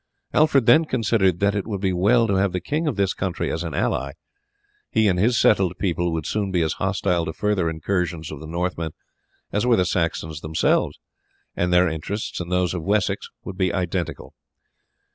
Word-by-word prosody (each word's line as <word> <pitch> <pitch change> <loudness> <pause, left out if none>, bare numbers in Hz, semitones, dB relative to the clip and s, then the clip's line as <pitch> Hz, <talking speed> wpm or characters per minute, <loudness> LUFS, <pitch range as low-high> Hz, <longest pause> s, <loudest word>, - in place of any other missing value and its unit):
Alfred 140 -5 +4
then 155 +8 +6
considered 105 - +1
that 100 0 +3
it 100 -2 -2
would 100 -3 -3
be 95 -1 0
well 105 +7 +3
to 100 - 0
have 95 -1 +1
the 90 - 0
king 150 - -2
of 145 - 0
this 100 -1 +1
country 95 -3 -2
as 80 - -2
an 80 -4 -4
ally; 70 +2 -1 0.8
he 110 - +2
and 90 -2 +2
his 120 +5 +3
settled 95 -4 +3
people 85 -2 0
would 80 -2 -3
soon 105 -2 -1
be 90 -3 +2
as 80 - 0
hostile 95 -2 +1
to 80 - -4
further 100 -4 0
incursions 85 0 -2
of 75 - -7
the 80 - -9
Northmen 85 -1 -3 0.6
as 105 - 0
were 125 -1 +4
the 90 - +2
Saxons 80 -3 -2
themselves, 80 0 +1 0.6
and 90 0 0
their 90 +1 +5
interests 80 +7 -4
and 90 0 -5
those 90 -1 +1
of 90 - -3
Wessex 100 +3 0
would 95 0 -8
be 95 -1 +2
identical. 85 -7 -3
90 Hz, 195 wpm, -23 LUFS, 85-100 Hz, 0.8 s, then